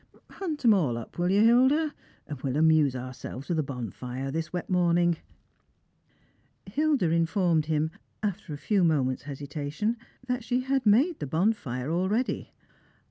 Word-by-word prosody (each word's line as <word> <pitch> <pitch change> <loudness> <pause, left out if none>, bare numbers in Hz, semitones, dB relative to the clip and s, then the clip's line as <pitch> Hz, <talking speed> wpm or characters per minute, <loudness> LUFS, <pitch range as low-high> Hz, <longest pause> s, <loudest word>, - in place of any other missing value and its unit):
Hunt 320 -9 -4
'em 225 - +8
all 145 - +1
up, 115 +8 -9
will 175 +1 +2
you, 200 +2 +4
Hilda? 260 +7 +4 0.3
and 145 -4 -7
we'll 135 0 -1
amuse 155 -4 +4
ourselves 130 +2 -7
with 170 -3 +1
a - - +4
bonfire 125 0 -5
this 160 +2 -3
wet 180 -1 -4
morning." 175 -2 +2 1.5
Hilda 270 - +1
informed 165 -1 +2
him, 155 0 0 0.3
after 200 -4 -3
a 145 - -4
few 195 +6 +1
moments' 135 -6 +1
hesitation, 145 - -3 0.3
that 250 -1 -2
she 245 +3 0
had 265 -2 0
made 270 - +4
the 145 - -4
bonfire 155 - 0
already. 195 +9 -1
170 Hz, 145 wpm, -27 LUFS, 145-220 Hz, 1.5 s, em